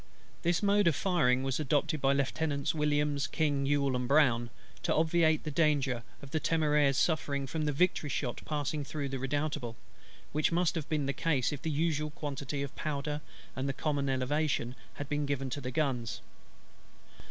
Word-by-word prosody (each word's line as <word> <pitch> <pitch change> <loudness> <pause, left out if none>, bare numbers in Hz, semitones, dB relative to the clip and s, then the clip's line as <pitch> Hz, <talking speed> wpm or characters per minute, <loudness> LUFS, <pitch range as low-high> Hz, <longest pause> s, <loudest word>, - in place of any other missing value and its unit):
This 175 +3 +1
mode 205 -1 +4
of 165 - +4
firing 130 -9 +2
was 135 0 -1
adopted 150 0 +1
by 135 - +4
Lieutenants 140 +1 0
WILLIAMS, 145 -2 +1
KING, 145 -3 0
YULE, 140 -2 +2
and 125 0 -1
BROWN, 125 -5 +4 0.3
to - - +1
obviate 160 -1 +3
the 155 - -3
danger 140 -5 +2 0.2
of 135 - -10
the 160 - +1
Temeraire's 150 -3 +2
suffering 145 -4 +1
from 155 +3 -2
the 150 - +1
Victory's 150 -1 +1
shot 125 -3 -2
passing 150 -1 -2
through 140 0 -4
the 135 0 -3
Redoutable; 140 -2 -2 0.6
which 150 +1 +1
must 175 0 +2
have 160 -5 -4
been 150 -3 0
the 140 - 0
case 145 -2 +1
if 140 - -6
the 160 - -2
usual 150 0 0
quantity 145 -2 -4
of 140 - -6
powder, 150 0 -3 0.3
and 130 +1 -2
the - - 0
common 140 -1 -1
elevation, 130 -1 0 0.2
had 145 - -5
been 145 0 -1
given 135 -2 -2
to 145 - -3
the 125 - -4
guns. 125 -5 -1
145 Hz, 175 wpm, -31 LUFS, 135-155 Hz, 0.6 s, mode